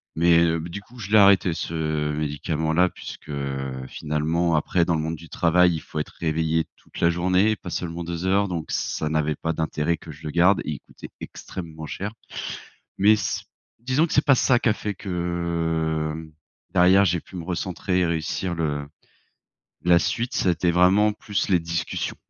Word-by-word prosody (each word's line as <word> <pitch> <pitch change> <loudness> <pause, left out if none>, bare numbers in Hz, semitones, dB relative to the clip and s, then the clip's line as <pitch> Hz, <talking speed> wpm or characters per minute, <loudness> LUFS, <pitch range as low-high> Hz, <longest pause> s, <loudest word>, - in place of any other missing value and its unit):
mais 85 0 +4
b 80 - -5
du 100 +4 -6
coup 120 +4 -16
je 105 -3 -6
l'ai 110 - +5
arrêté 100 -3 +6
ce 80 -2 -2
médicament-là 80 +3 0
puisque - - -10 0.6
finalement, 80 +4 0
après, 85 +3 +2
dans 85 - +1
le 80 - 0
monde 80 +1 -2
du 80 +1 -13
travail, 90 +1 +3
il 80 - -2
faut - - -9
être 75 - -4
réveillé 80 0 0
toute - - -13
la 85 - +4
journée, 90 +5 +2
pas - - -9
seulement 85 0 -3
2 85 +1 -4
heures, 100 +2 +3
donc 85 -3 -3
ça 75 - -1
n'avait 75 -1 0
pas 80 +3 -2
d'intérêt 80 0 0
que 80 - -11
je 75 +1 -14
le 75 - -4
garde 90 +5 +4
et - - -2
il 70 - -7
coûtait - - -12
extrêmement 80 -3 -8
cher. 100 +7 -4 0.9
Mais 100 +3 +6
s 105 - -2 0.4
disons 130 +7 +2
que - - -7
c'est 145 - +4
pas 145 - +6
ça 125 -1 +3
qui 120 - +1
a - - +4
fait 105 -1 -4
que 85 -4 -1 0.6
derrière 95 +2 +6
j'ai 85 -2 +1
pu 95 - -12
me 85 - -5
recentrer 90 +1 -1
et 90 - +3
réussir 85 +2 -2
le 75 -3 -2 1.0
la 85 0 +6
suite, 120 +9 -1
ça 95 - +2
a - - +6
été 85 +1 0
vraiment 95 +5 +4
plus 105 -1 -2
les 90 -3 +4
discussions, 85 -1 -3
85 Hz, 190 wpm, -24 LUFS, 80-95 Hz, 1.0 s, arrêté